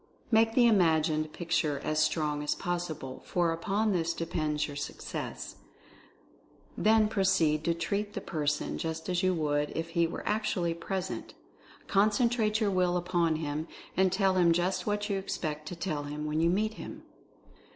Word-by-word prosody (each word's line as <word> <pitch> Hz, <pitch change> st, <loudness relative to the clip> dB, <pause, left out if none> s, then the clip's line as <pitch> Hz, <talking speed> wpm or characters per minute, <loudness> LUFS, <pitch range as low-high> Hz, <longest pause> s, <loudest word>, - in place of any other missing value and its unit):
Make 225 Hz, 0 st, +4 dB
the 245 Hz, -, +6 dB
imagined 160 Hz, -7 st, +3 dB
picture 165 Hz, -4 st, 0 dB
as 155 Hz, 0 st, +1 dB
strong 150 Hz, -1 st, +1 dB
as 150 Hz, -, 0 dB
possible, 170 Hz, -7 st, -4 dB
for 175 Hz, -2 st, +1 dB
upon 205 Hz, +6 st, 0 dB
this 170 Hz, -2 st, 0 dB
depends 155 Hz, -2 st, -1 dB
your 145 Hz, -, -7 dB
success. -, -, -5 dB, 1.2 s
Then 220 Hz, 0 st, +4 dB
proceed 185 Hz, -7 st, +2 dB
to 170 Hz, -, +2 dB
'treat' 205 Hz, +5 st, -2 dB
the -, -, -3 dB
person 150 Hz, -3 st, -2 dB
just 160 Hz, +1 st, -4 dB
as 180 Hz, -1 st, +1 dB
you 185 Hz, -1 st, +2 dB
would 150 Hz, -2 st, 0 dB
if 165 Hz, +1 st, -3 dB
he 170 Hz, 0 st, +2 dB
were 165 Hz, -, -6 dB
actually 200 Hz, -5 st, 0 dB
present. 185 Hz, +2 st, -4 dB, 0.5 s
Concentrate 215 Hz, +2 st, +2 dB
your 210 Hz, -3 st, +1 dB
will 180 Hz, -1 st, +2 dB
upon 175 Hz, -2 st, +1 dB
him, 155 Hz, 0 st, -3 dB, 0.3 s
and 190 Hz, 0 st, +3 dB
tell 190 Hz, 0 st, +2 dB
him 170 Hz, -2 st, +5 dB
just 175 Hz, +4 st, 0 dB
what 205 Hz, 0 st, 0 dB
you 200 Hz, -2 st, 0 dB
expect 155 Hz, -5 st, -4 dB
to 175 Hz, -, -5 dB
tell 155 Hz, -4 st, -3 dB
him 150 Hz, +1 st, -5 dB
when 150 Hz, +1 st, 0 dB
you 165 Hz, -, +4 dB
meet 215 Hz, +4 st, +1 dB
him. -, -, -8 dB
170 Hz, 160 wpm, -30 LUFS, 155-195 Hz, 1.2 s, the